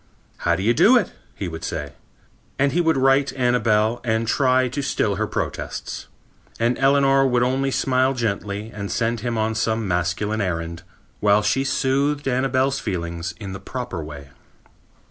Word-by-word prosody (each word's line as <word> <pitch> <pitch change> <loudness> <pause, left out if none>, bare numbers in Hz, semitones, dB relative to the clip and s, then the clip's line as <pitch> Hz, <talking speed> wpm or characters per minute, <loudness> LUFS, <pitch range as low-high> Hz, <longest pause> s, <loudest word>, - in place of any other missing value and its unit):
'How - - +1
do 95 - -3
you 115 +3 +3
do 230 - +6
it?' 210 - 0 0.2
he 95 - -4
would 80 -1 -7
say. 75 -4 -4 0.6
And 140 0 +2
he 175 - +2
would 160 -3 +2
right 135 +1 +3
Annabel 120 -3 +2
and 110 -1 0
try 130 +1 +3
to 130 +4 -3
still 135 - 0
her - - -1
protests. - - -4 0.5
And 120 +2 +2
Eleanor 135 0 +4
would 125 -1 +2
only 135 +2 +1
smile 130 0 +1
gently 105 -2 -3
and 100 -2 -5
send 115 0 0
him 115 +1 -2
on 110 0 0
some 110 0 -1
masculine 90 +5 -1
errand, 85 -2 -3 0.4
while 105 0 +3
she 135 +6 +1
soothed 140 +2 0
Annabel's 135 +1 +1
feelings 85 -3 -4
in 100 -3 -6
the 95 - -6
proper 125 -10 -5
way." 70 -2 -9
115 Hz, 165 wpm, -22 LUFS, 100-135 Hz, 0.6 s, do